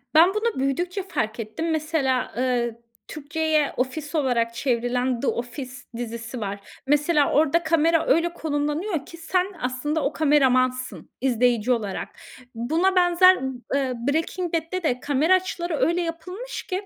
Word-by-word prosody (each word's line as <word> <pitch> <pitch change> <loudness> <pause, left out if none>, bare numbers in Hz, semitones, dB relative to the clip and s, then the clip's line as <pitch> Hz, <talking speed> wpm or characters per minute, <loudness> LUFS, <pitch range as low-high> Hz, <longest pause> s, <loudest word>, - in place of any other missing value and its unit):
Ben, 335 +3 +8
bunu 430 - -1
büyüdükçe 350 +8 -1
fark 220 - -3
ettim. 275 +10 -3
Mesela, 305 -5 0
ııı, 240 -2 0 0.3
Türkçe'ye 310 0 0
ofis 295 +5 -3
olarak 240 -5 +1
çevrilen, 245 0 0
The 275 - -2
Office 250 +2 -3 0.3
dizisi 235 +1 -5
var. 200 -1 -4 0.3
Mesela 295 +1 +3
orada 315 +3 +3
kamera 325 0 +3
öyle 340 +1 +2
konumlanıyor 300 +2 -2
ki, 335 - -11
sen 360 +2 0 0.2
aslında 255 +5 -1
o 290 - 0
kameramansın 255 -4 +2
izleyici 245 -2 +2
olarak. 210 -5 -2 0.5
Buna 325 +11 +1
benzer 365 +1 +6
b - - -2 0.3
ııı, 255 -2 -2
Breaking 330 +4 -1
Bad'de 330 +3 -2
de 250 -5 0
kamera 295 +6 +2
açıları 345 -3 0
öyle 340 +2 +2
yapılmış 360 +8 -5
ki 380 +1 -4
295 Hz, 140 wpm, -24 LUFS, 250-335 Hz, 0.5 s, Ben